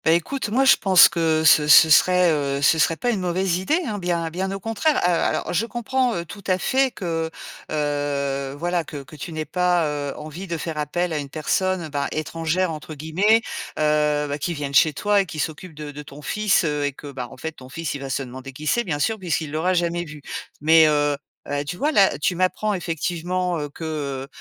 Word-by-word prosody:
Bah, -, -, +2 dB
écoute, 215 Hz, -, -1 dB
moi, 260 Hz, +5 st, +2 dB
je 270 Hz, -, +7 dB
pense 190 Hz, -2 st, +7 dB
que 160 Hz, -2 st, +1 dB
ce 150 Hz, -1 st, +6 dB
ce 155 Hz, +1 st, +8 dB
serait, 180 Hz, +2 st, +5 dB
heu, 140 Hz, -2 st, -1 dB
ce 160 Hz, +3 st, +4 dB
serait 165 Hz, -, +3 dB
pas 245 Hz, -, 0 dB
une 215 Hz, -, -1 dB
mauvaise 180 Hz, 0 st, 0 dB
idée, 300 Hz, -, +1 dB
hein, 210 Hz, -5 st, -3 dB
bien 170 Hz, -2 st, -1 dB
bien 190 Hz, +3 st, -3 dB
au 195 Hz, -, -4 dB
contraire, 225 Hz, +9 st, 0 dB
heu, -, -, +3 dB
alors 170 Hz, -, 0 dB
je 220 Hz, +7 st, 0 dB
comprends, 245 Hz, +1 st, -1 dB
heu, 170 Hz, -, -3 dB
tout 200 Hz, +5 st, -10 dB
à 185 Hz, -1 st, +2 dB
fait 265 Hz, +7 st, +2 dB
que, 165 Hz, -7 st, -3 dB, 0.4 s
heu, 140 Hz, -2 st, -2 dB
voilà, 175 Hz, +2 st, -1 dB
que 145 Hz, -2 st, -8 dB
que 135 Hz, +3 st, -14 dB
tu 155 Hz, +3 st, -7 dB
n'aies 155 Hz, -1 st, -4 dB
pas, 180 Hz, -1 st, +1 dB
heu, 145 Hz, -2 st, -3 dB
envie 155 Hz, +5 st, -8 dB
de 170 Hz, -1 st, -3 dB
faire 160 Hz, -1 st, -5 dB
appel 170 Hz, +3 st, -1 dB
à 155 Hz, -, -1 dB
une 140 Hz, -1 st, -6 dB
personne, 170 Hz, +3 st, -1 dB
ben, 140 Hz, -1 st, -2 dB
«étrangère» 165 Hz, +3 st, -1 dB
entre 155 Hz, 0 st, -7 dB
guillemets, 185 Hz, +10 st, +2 dB, 0.4 s
heu, 150 Hz, -1 st, +2 dB
bah, 145 Hz, +1 st, -4 dB
qui 170 Hz, +4 st, -2 dB
vienne 145 Hz, -2 st, -4 dB
chez 155 Hz, +3 st, +5 dB
toi 205 Hz, +5 st, +2 dB
et 195 Hz, -, -5 dB
qui 160 Hz, -, -8 dB
s'occupe 160 Hz, +2 st, -4 dB
de 150 Hz, -1 st, -7 dB
de 145 Hz, +1 st, -8 dB
ton 145 Hz, 0 st, -12 dB
fils, 210 Hz, +7 st, +1 dB
heu, 150 Hz, -2 st, -1 dB
et 145 Hz, -1 st, -1 dB
que, 145 Hz, +1 st, -10 dB
ben, 125 Hz, -2 st, -6 dB
en -, -, -13 dB
fait, 160 Hz, -, -5 dB
ton 130 Hz, -5 st, -14 dB
fils, 165 Hz, +3 st, -4 dB
il 140 Hz, -, -6 dB
va 135 Hz, -, -6 dB
se 135 Hz, +1 st, -1 dB
demander 130 Hz, +1 st, -9 dB
qui 150 Hz, +4 st, -9 dB
c'est, 240 Hz, +9 st, +2 dB
bien 165 Hz, -8 st, -2 dB
sûr, 220 Hz, +9 st, 0 dB
puisqu'il 165 Hz, -4 st, -2 dB
l'aura 170 Hz, +5 st, 0 dB
jamais 175 Hz, 0 st, 0 dB
vu 155 Hz, -3 st, -11 dB, 0.4 s
mais 160 Hz, +1 st, +6 dB
heu -, -, +3 dB, 0.6 s
heu, -, -, -4 dB
et 145 Hz, -, -2 dB
tu 145 Hz, -, -4 dB
vois? 295 Hz, +11 st, 0 dB
Là, 195 Hz, -, +3 dB
tu 175 Hz, -, 0 dB
m'apprends, 185 Hz, +4 st, 0 dB
effectivement, 175 Hz, +1 st, -2 dB
heu, 145 Hz, -, -3 dB
que, 145 Hz, -4 st, -5 dB
160 Hz, 230 wpm, -22 LUFS, 150-185 Hz, 0.6 s, ce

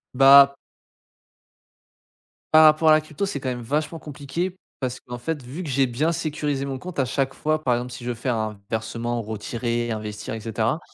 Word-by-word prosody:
Bah 140 Hz, +1 st, +8 dB, 2.0 s
par 155 Hz, 0 st, +8 dB
rapport 155 Hz, +1 st, +5 dB
à -, -, +8 dB
la 155 Hz, -, +5 dB
crypto, 155 Hz, +5 st, -4 dB
c'est 195 Hz, -8 st, -3 dB
quand 130 Hz, -, -3 dB
même 125 Hz, -1 st, -4 dB
vachement 150 Hz, +6 st, -2 dB
compliqué 155 Hz, +6 st, -4 dB, 0.3 s
parce 130 Hz, -1 st, -3 dB
qu'en 125 Hz, 0 st, -8 dB
fait, 150 Hz, +4 st, -3 dB
vu 135 Hz, +9 st, -7 dB
que 160 Hz, -, -6 dB
j'ai 135 Hz, 0 st, +2 dB
bien 140 Hz, +7 st, 0 dB
sécurisé 150 Hz, -4 st, -2 dB
mon 135 Hz, -1 st, -4 dB
compte 180 Hz, +2 st, -7 dB
à 135 Hz, -, +3 dB
chaque 135 Hz, +2 st, -1 dB
fois, 155 Hz, 0 st, -1 dB
par 125 Hz, -4 st, +2 dB
exemple, 125 Hz, +1 st, -4 dB
si 125 Hz, 0 st, -8 dB
je 120 Hz, -, -3 dB
veux 120 Hz, -, -2 dB
faire 120 Hz, +1 st, -1 dB
un 110 Hz, -2 st, -3 dB
versement, 115 Hz, +2 st, -2 dB
ou -, -, -4 dB
retirer, 115 Hz, +2 st, -3 dB
investir 105 Hz, -2 st, -5 dB
et 110 Hz, -, -4 dB
cetera, 115 Hz, +6 st, -1 dB
135 Hz, 205 wpm, -24 LUFS, 120-155 Hz, 2.0 s, Bah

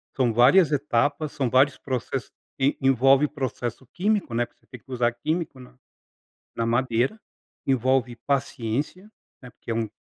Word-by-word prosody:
são 125 Hz, -4 st, +2 dB
várias 150 Hz, -, +5 dB
etapas, 145 Hz, +1 st, 0 dB
são 135 Hz, -4 st, -1 dB
vários 135 Hz, +4 st, +4 dB
processos 130 Hz, 0 st, -4 dB, 0.3 s
que 140 Hz, +1 st, +1 dB
envolve 135 Hz, +2 st, +4 dB
processo 130 Hz, -3 st, -4 dB
químico, 195 Hz, -, -1 dB
né. 120 Hz, +1 st, +1 dB
Porque -, -, -30 dB
você -, -, -32 dB
tem 125 Hz, -, -11 dB
que 120 Hz, -, -17 dB
usar 120 Hz, -1 st, +1 dB
químico 155 Hz, +1 st, -3 dB
na 125 Hz, 0 st, -15 dB, 0.8 s
na 115 Hz, -, 0 dB
madeira, 120 Hz, -, 0 dB, 0.5 s
envolve 130 Hz, -2 st, +1 dB
paciência, 140 Hz, -, -2 dB, 0.3 s
né, 125 Hz, -, -11 dB
porque 115 Hz, -, -7 dB
é -, -, -1 dB
um 115 Hz, -1 st, -1 dB
130 Hz, 155 wpm, -25 LUFS, 120-145 Hz, 0.8 s, várias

